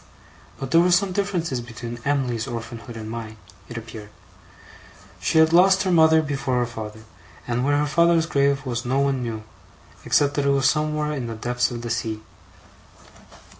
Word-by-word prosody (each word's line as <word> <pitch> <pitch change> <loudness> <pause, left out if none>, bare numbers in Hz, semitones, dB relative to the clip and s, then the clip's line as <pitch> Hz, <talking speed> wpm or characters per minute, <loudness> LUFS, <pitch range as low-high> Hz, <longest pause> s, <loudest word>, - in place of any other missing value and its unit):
But 135 -1 -5
there 165 - +6
were 180 - +3
some 185 +2 +3
differences 180 -9 -1
between 120 0 -8
Em'ly's 130 -4 -1
orphanhood 115 -1 -7
and 110 -1 -7
mine, 110 -1 -7 0.3
it 120 - -7
appeared. 110 -2 -9 1.1
She - - 0
had 160 0 +5
lost 190 +2 +5
her 185 - 0
mother 160 -1 +5
before 135 -3 -2
her 120 - +2
father; 110 -2 -8 0.5
and 120 +1 -1
where 145 +1 +2
her 150 - +1
father's 170 +2 +3
grave 140 -2 +1
was 120 -1 -3
no 130 +2 0
one 140 -2 +1
knew, 115 -3 -4 0.6
except 145 -1 +2
that 145 -1 -1
it - - +4
was 140 0 +3
somewhere 150 +1 0
in 135 -5 -3
the 115 - -5
depths 120 +2 -1
of 120 -1 -6
the 120 - -4
sea. 110 -2 -3
135 Hz, 175 wpm, -23 LUFS, 115-155 Hz, 1.1 s, there